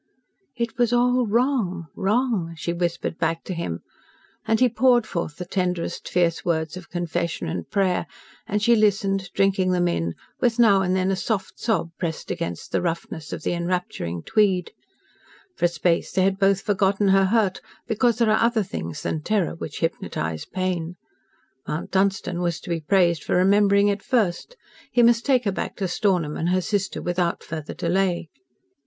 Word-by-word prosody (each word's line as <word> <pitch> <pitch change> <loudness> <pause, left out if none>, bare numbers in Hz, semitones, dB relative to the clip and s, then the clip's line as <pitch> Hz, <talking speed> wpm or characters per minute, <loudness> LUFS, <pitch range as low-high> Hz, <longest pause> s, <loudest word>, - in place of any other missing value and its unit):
"It 235 -1 -3
was 240 -1 +3
all 245 0 +3
wrong 220 -7 +1
wrong!" 205 -5 0
she 170 +2 -2
whispered 170 -1 -2
back 165 0 0
to 185 - -5
him, 125 - -4 0.7
and 220 0 +2
he 255 - +5
poured 240 0 +3
forth 170 -7 -4
the 180 - -6
tenderest, 180 -2 -2
fierce 170 -2 +1
words 160 -2 -1
of 185 -2 -10
confession 170 - -2
and 80 +1 -4
prayer, 190 -3 +1 0.4
and 210 0 -1
she 235 +1 +5
listened, 195 -3 +1
drinking 190 -2 +2
them 175 -1 +2
in, 85 - -1 0.2
with 240 -2 +1
now 210 -5 +5
and 185 0 +1
then 190 0 +1
a - - +1
soft 190 0 -3
sob 170 -8 0
pressed 165 -3 -3
against 85 -1 -4
the - - +1
roughness 165 -2 -4
of - - -5
the - - 0
enrapturing 170 - -3
tweed. 195 -5 +2 0.8
For - - +1
a - - +7
space 170 0 0
they 190 - +2
had 195 0 +1
both 195 -1 +3
forgotten 200 0 +2
her 195 0 +5
hurt, 205 -2 +1 0.2
because 235 0 +1
there 230 -3 +3
are 215 - +3
other 230 -2 +2
things 85 - -6
than 155 - -2
terror 200 +1 0
which 160 -2 -7
hypnotise 80 - -2
pain. 180 -2 -3 0.7
Mount 150 +2 -4
Dunstan 190 -2 0
was 170 -2 -1
to - - -7
be 170 - 0
praised 170 -1 +2
for - - 0
remembering 200 +2 +4
it 200 -1 0
first. 235 - -1 0.3
He 240 - +4
must 235 +1 +4
take 255 -4 +3
her 200 - +2
back 185 - -4
to 195 - -2
Stornham 180 -5 0
and 165 - -1
her 185 +1 +2
sister 195 0 -2
without 175 -1 -1
further 155 -2 -6
delay. 175 -1 0
185 Hz, 175 wpm, -24 LUFS, 170-210 Hz, 0.8 s, a